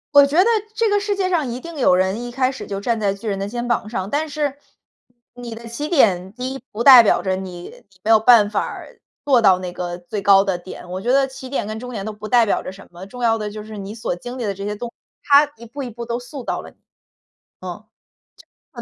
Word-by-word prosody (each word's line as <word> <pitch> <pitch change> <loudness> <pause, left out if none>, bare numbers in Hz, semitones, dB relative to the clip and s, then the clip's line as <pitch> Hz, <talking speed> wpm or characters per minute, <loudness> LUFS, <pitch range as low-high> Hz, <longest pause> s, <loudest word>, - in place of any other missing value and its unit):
我 285 0 +9
觉 280 +3 -2
得 - - +3 0.3
这 455 0 +1
个 410 - +3
世 410 0 -1
界 375 -2 0
上 340 -5 +1
一 240 - -5
定 335 +3 -9
有 250 -9 +4
人 190 +4 +1
一 245 - -6
开 255 +1 +1
始 265 - -7
就 195 -1 -4
站 230 +3 -1
在 200 -2 +1
巨 200 +3 -9
人 200 -2 -1
的 195 +1 -4
肩 240 +2 -4
膀 235 -3 -1
上。 190 -4 -3
但 305 +4 -1
是 290 -2 -2 0.8
你 245 -2 -8
的 230 +1 -10
起 290 +6 -5
点 190 - +3
第 250 +4 -5
一 270 - -9
不 215 - -5
代 260 -4 +11
表 210 - +3
着 185 +1 -1
你， 185 -2 -7
你 - - -15 0.2
没 215 - -4
有 225 - +8
办 220 -2 +6
法 210 - 0
儿 - - -10 0.2
做 265 -4 +4
到 190 -4 +5
那 180 -1 -6
个 175 -1 -4
最 180 +4 -6
高 195 0 +6
的 195 -2 -1
点。 175 0 -11
我 185 +1 -5
觉 240 - 0
得 270 0 +4
起 265 -1 -10
点 265 -6 -2
跟 215 +1 -5
终 250 0 -7
点 200 -5 -5
都 215 - -4
不 210 +1 -9
代 240 -2 +5
表 205 - 0
着 - - -6
什 195 +1 -14
么， 175 +2 -9
重 245 +5 -8
要 225 -1 +3
的 210 -1 -4
就 215 +1 -7
是 215 0 -9
你 200 +1 -7
所 220 -5 -3
经 245 +8 -8
历 245 - -3
的 200 - -1
这 195 +1 -8
些 205 +1 -2
动 240 - -5
作， 235 - -13 0.3
它 290 +1 +5
一 235 - -12
步 275 +5 -7
一 250 - -5
步 235 +1 -7
都 235 0 -2
塑 250 +1 -9
造 - - -2
了 - - -11
你， - - -32 0.8
嗯。 - - -7 0.9
就 - - -6
230 Hz, 295 characters per minute, -20 LUFS, 195-260 Hz, 0.9 s, 代